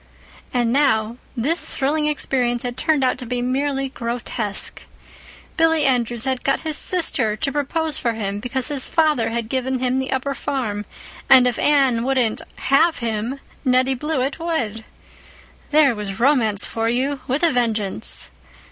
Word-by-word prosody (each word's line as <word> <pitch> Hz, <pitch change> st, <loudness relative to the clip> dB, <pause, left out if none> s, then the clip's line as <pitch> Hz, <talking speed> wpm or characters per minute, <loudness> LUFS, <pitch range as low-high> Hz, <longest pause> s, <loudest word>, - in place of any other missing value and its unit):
And 240 Hz, -2 st, +1 dB
now, 235 Hz, -5 st, +2 dB, 0.2 s
this 295 Hz, +9 st, 0 dB
thrilling 300 Hz, +3 st, 0 dB
experience 250 Hz, -5 st, 0 dB
had 245 Hz, -1 st, -4 dB
turned 300 Hz, 0 st, +1 dB
out 255 Hz, -1 st, +1 dB
to 250 Hz, -, -6 dB
be 250 Hz, +1 st, -2 dB
merely 270 Hz, +2 st, -1 dB
grotesque. 235 Hz, -4 st, -3 dB, 0.7 s
Billy 325 Hz, -2 st, +3 dB
Andrews 240 Hz, -3 st, +1 dB
had 260 Hz, -1 st, -2 dB
got 275 Hz, -, +1 dB
his 315 Hz, -2 st, -2 dB
sister 280 Hz, -12 st, +2 dB
to 275 Hz, +6 st, -2 dB
propose 295 Hz, +2 st, -1 dB
for 235 Hz, -, 0 dB
him 205 Hz, -2 st, -3 dB
because 245 Hz, +5 st, -2 dB
his 280 Hz, -3 st, -2 dB
father 305 Hz, -8 st, +2 dB
had 230 Hz, -1 st, -3 dB
given 260 Hz, +2 st, -1 dB
him 255 Hz, +1 st, 0 dB
the 265 Hz, 0 st, -3 dB
upper 270 Hz, +1 st, -1 dB
farm; 230 Hz, -8 st, -3 dB, 0.4 s
and 260 Hz, -2 st, +8 dB
if 245 Hz, -2 st, 0 dB
Anne 270 Hz, -6 st, +3 dB
wouldn't 255 Hz, -4 st, +1 dB
"have 315 Hz, +4 st, +3 dB
him" 235 Hz, +2 st, -3 dB, 0.2 s
Nettie 255 Hz, 0 st, +3 dB
Blewett 275 Hz, 0 st, -2 dB
would. 235 Hz, -10 st, -2 dB, 0.8 s
There 295 Hz, -4 st, +5 dB
was 210 Hz, -1 st, -5 dB
romance 230 Hz, -6 st, +3 dB
for 225 Hz, 0 st, -2 dB
you, 270 Hz, +3 st, -1 dB
with 270 Hz, +6 st, -1 dB
a 335 Hz, -, +5 dB
vengeance! 215 Hz, -, 0 dB
255 Hz, 155 wpm, -21 LUFS, 230-280 Hz, 0.8 s, and